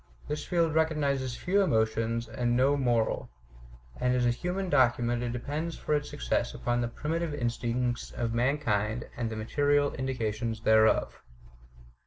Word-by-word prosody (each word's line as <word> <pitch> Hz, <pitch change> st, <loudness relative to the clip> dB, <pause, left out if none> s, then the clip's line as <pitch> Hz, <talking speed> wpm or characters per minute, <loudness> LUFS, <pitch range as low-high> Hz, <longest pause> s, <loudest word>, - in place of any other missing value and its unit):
This 150 Hz, 0 st, -3 dB
field 170 Hz, -3 st, +1 dB
recognizes 140 Hz, -5 st, 0 dB
few 195 Hz, +3 st, +2 dB
emotions 115 Hz, -, +1 dB
and 120 Hz, +1 st, 0 dB
no 135 Hz, +3 st, +4 dB
moral; 120 Hz, -5 st, 0 dB, 0.7 s
and 125 Hz, 0 st, +1 dB
as 125 Hz, -1 st, +2 dB
a 120 Hz, -, +4 dB
human 180 Hz, +9 st, -3 dB
document 120 Hz, -5 st, +2 dB
it 120 Hz, -1 st, -2 dB
depends 150 Hz, +7 st, -4 dB
for 150 Hz, -, -2 dB
its 145 Hz, 0 st, 0 dB
success -, -, -1 dB
upon 120 Hz, 0 st, -1 dB
the 120 Hz, -, 0 dB
primitive 155 Hz, +5 st, -3 dB
instincts 120 Hz, -1 st, -1 dB
of 115 Hz, -1 st, -3 dB
mankind 115 Hz, -4 st, 0 dB
and 120 Hz, -2 st, -2 dB
the 110 Hz, -, -5 dB
material 145 Hz, +6 st, +1 dB
indications 115 Hz, -4 st, -2 dB
thereof. 110 Hz, 0 st, +3 dB
125 Hz, 145 wpm, -29 LUFS, 115-145 Hz, 0.7 s, no